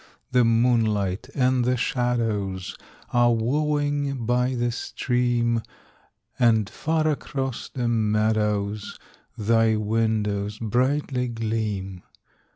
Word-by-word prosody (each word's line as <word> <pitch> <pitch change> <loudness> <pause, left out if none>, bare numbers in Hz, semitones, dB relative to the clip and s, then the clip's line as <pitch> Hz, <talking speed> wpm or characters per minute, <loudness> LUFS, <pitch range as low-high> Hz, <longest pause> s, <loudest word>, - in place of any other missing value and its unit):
The 125 -1 +4
moonlight 115 -2 +1
and 130 -2 +2
the 125 +1 +1
shadows 115 -7 -1 0.4
Are 120 0 +4
wooing 145 +1 0
by 125 +2 +1
the 120 0 0
stream, 120 -1 0 0.8
And 110 -4 +4
far 155 +7 -1
across 135 -4 -3
the 125 -3 -2
meadows 105 -2 0 0.4
Thy 115 +1 +3
windows 105 -1 0
brightly 125 +3 0
gleam. 110 -5 -3
115 Hz, 90 wpm, -24 LUFS, 110-125 Hz, 0.8 s, The